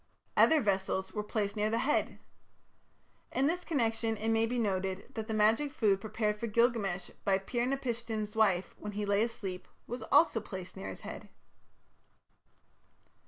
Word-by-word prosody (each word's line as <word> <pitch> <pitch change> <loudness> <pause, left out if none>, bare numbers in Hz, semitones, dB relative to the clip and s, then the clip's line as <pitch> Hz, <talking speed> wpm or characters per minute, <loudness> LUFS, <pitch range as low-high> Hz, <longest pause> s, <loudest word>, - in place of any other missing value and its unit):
Other 315 -2 +6
vessels 190 -2 0
were 210 - -1
placed 210 -1 -2
near 210 0 +1
the 225 - +1
head. 285 +5 +1 1.1
In 265 - +1
this 350 +4 0
connection 225 -7 0
it 220 +2 -2
may 225 0 +3
be 245 +2 -2
noted 195 -3 -1
that 220 -1 -4
the 220 - -2
magic 220 +7 +3
food 200 -7 +2
prepared 210 0 -1
for 235 - -2
Gilgamesh 210 -6 +1
by 195 -1 +3
Pir 240 +5 -2
napishtim's 230 -5 -2
wife, 195 -5 +2
when 210 0 -6
he 210 +1 -2
lay 200 0 +2
asleep, 200 -5 -3 0.2
was 245 +1 -5
also 315 -8 +5
placed 185 -3 -7
near 190 - -6
his - - -8
head. - - -8
215 Hz, 160 wpm, -32 LUFS, 200-235 Hz, 1.1 s, Other